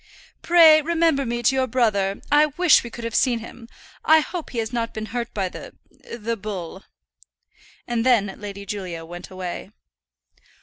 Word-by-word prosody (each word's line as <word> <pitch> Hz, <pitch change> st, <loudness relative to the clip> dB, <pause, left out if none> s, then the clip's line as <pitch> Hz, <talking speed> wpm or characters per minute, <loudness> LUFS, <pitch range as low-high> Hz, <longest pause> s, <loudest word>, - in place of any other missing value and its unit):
"Pray 325 Hz, -3 st, +7 dB
remember 325 Hz, -4 st, +1 dB
me 240 Hz, 0 st, -3 dB
to 250 Hz, -, +4 dB
your 260 Hz, -1 st, +1 dB
brother. 205 Hz, -5 st, 0 dB
I 295 Hz, +1 st, +5 dB
wish 330 Hz, +3 st, +4 dB
we 235 Hz, -, -7 dB
could 235 Hz, 0 st, -9 dB
have 230 Hz, -1 st, -4 dB
seen 250 Hz, -1 st, +2 dB
him; 230 Hz, +1 st, -11 dB, 0.3 s
I 315 Hz, 0 st, +5 dB
hope 340 Hz, +1 st, -6 dB
he 245 Hz, -, -8 dB
has 225 Hz, +1 st, -2 dB
not 230 Hz, -1 st, -3 dB
been 220 Hz, 0 st, -4 dB
hurt 240 Hz, -2 st, -3 dB
by 195 Hz, -3 st, -2 dB
the -, -, -10 dB, 0.4 s
the 230 Hz, +1 st, -3 dB
bull." 195 Hz, -3 st, -7 dB, 1.0 s
And 235 Hz, -1 st, -1 dB
then 220 Hz, -6 st, +2 dB
Lady 200 Hz, -1 st, -8 dB
Julia 185 Hz, -5 st, -6 dB
went 175 Hz, +2 st, -9 dB
her 185 Hz, -, -14 dB
way. 185 Hz, 0 st, -6 dB
230 Hz, 175 wpm, -22 LUFS, 200-270 Hz, 1.0 s, Pray